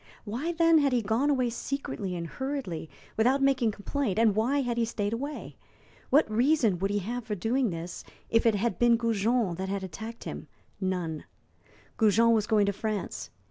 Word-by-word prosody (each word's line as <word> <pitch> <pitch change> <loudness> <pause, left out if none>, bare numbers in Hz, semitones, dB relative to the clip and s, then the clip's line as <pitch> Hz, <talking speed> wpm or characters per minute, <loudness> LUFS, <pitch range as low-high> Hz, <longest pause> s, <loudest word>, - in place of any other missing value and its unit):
Why, 245 +11 -2
then, 330 -1 +4
had 280 -3 +2
he 240 -2 +2
gone 225 +8 +1
away 255 -4 +1
secretly 235 -7 -4
and 170 -1 -4
hurriedly, 255 - -4 0.3
without 250 +5 +3
making 270 -4 +3
complaint, 210 +1 -2
and 220 -3 +4
why 255 +6 +2
had 240 -2 -2
he 235 - +2
stayed 215 -2 -2
away? 285 +6 -5 0.5
What 290 +4 +5
reason 230 - +2
would 195 +2 0
he 205 - 0
have 235 +5 -3
for 215 -2 -3
doing 235 +6 0
this 170 0 -6 0.2
if 230 0 +3
it 225 - +4
had 230 +4 -1
been 240 -1 +5
Goujon 230 -2 +1
that 190 0 -3
had 195 0 -2
attacked 220 +5 -7
him? - - -7 0.3
None. 180 -5 -2 0.7
Goujon 225 +1 +4
was 215 -2 +1
going 210 -2 +3
to 200 - 0
France. 210 -1 -4
225 Hz, 180 wpm, -28 LUFS, 200-255 Hz, 0.7 s, What